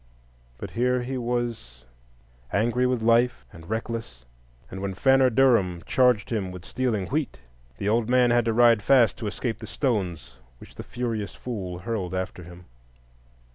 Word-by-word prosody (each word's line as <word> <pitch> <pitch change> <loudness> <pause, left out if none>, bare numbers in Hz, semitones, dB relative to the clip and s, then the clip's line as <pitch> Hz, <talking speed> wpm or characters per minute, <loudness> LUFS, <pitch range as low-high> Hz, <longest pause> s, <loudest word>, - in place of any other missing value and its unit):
But - - -7
here 125 +1 +1
he 130 +2 -4
was, 120 - -4 0.7
angry 120 +4 +1
with 125 -3 -1
life 120 +1 +2
and 80 -1 -13
reckless; 110 - -5 0.5
and 95 - -6
when 100 -1 -3
Fanner 135 +4 +4
Durham 110 -9 +2
charged 125 -5 +2
him 100 -5 -2
with 90 0 -10
stealing 115 -6 -1
wheat, 150 0 -2 0.4
the 100 - -3
old 115 +2 +1
man 125 -1 +4
had 120 -1 +3
to 115 - +1
ride 120 -1 +5
fast 120 -4 +4
to 110 - -4
escape 115 +2 -3
the - - -8
stones 90 - -2 0.2
which - - -15
the - - -8
furious 115 -6 -4
fool 95 -8 -5
hurled 95 -2 -4
after 95 -1 -4
him. 90 +1 -13
115 Hz, 160 wpm, -25 LUFS, 95-125 Hz, 0.7 s, ride